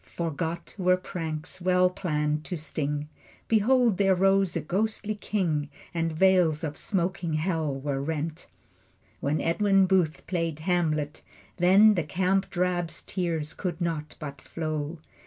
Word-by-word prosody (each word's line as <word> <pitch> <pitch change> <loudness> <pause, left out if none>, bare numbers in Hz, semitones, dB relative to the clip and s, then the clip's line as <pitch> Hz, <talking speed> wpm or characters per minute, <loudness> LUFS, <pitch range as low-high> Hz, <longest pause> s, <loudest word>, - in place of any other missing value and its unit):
Forgot 165 0 -4
were 185 0 +4
pranks 165 -2 -5
well 180 0 +4
planned 150 -4 -1
to 180 - -4
sting. 150 -1 -3 0.4
Behold 230 -1 +3
there 195 -1 +4
rose 195 -1 +3
a - - -2
ghostly 215 +6 -1
king, 170 -8 -1 0.2
And 165 -1 0
veils 170 -2 +3
of 150 -2 -3
smoking 175 -3 -1
Hell 160 -3 0
were 135 -1 -2
rent. 155 +2 -3 0.7
When 145 +3 0
Edwin 195 +3 +3
Booth 180 -4 +1
played 165 -4 -1
Hamlet, 155 -4 0 0.4
then 195 +5 +6
The 175 -5 0
camp 190 +5 0
drab's 175 -2 -1
tears 165 -5 -2
could 180 -2 -4
not 160 -3 -3
but 140 -2 -7
flow. 155 0 -4
170 Hz, 135 wpm, -27 LUFS, 155-185 Hz, 0.7 s, then